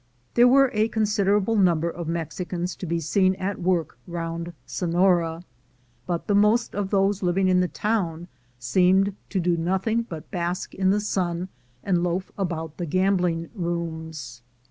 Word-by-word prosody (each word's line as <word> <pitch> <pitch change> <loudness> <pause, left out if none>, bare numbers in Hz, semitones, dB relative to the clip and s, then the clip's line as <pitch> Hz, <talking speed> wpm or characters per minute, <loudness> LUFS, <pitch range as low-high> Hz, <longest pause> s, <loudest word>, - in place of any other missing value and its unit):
There 240 +1 +6
were 270 +1 +5
a 215 0 +2
considerable 210 -1 +1
number 170 -5 +3
of 170 -1 -5
Mexicans 175 +2 -3
to 185 - -6
be 170 +1 0
seen 185 +4 +2
at 190 +1 -3
work 170 -8 0
round 170 0 -4
Sonora, 175 -2 +1 0.6
but 175 -2 -2
the 205 - +1
most 210 +4 +3
of 200 -1 -2
those 195 0 +2
living 185 +1 +2
in 180 0 +4
the 180 - +2
town 175 -5 -2 0.3
seemed 185 +10 +3
to 195 - -1
do 175 0 +2
nothing 190 +7 0
but 165 -8 -9
bask 175 0 -3
in 190 0 +1
the 205 +2 +3
sun 180 -3 -2 0.3
and 180 -3 +1
loaf 180 +1 -2
about 165 -5 -3
the 175 - -3
gambling 180 -1 +1
rooms. 160 - -5
180 Hz, 155 wpm, -25 LUFS, 170-195 Hz, 0.6 s, There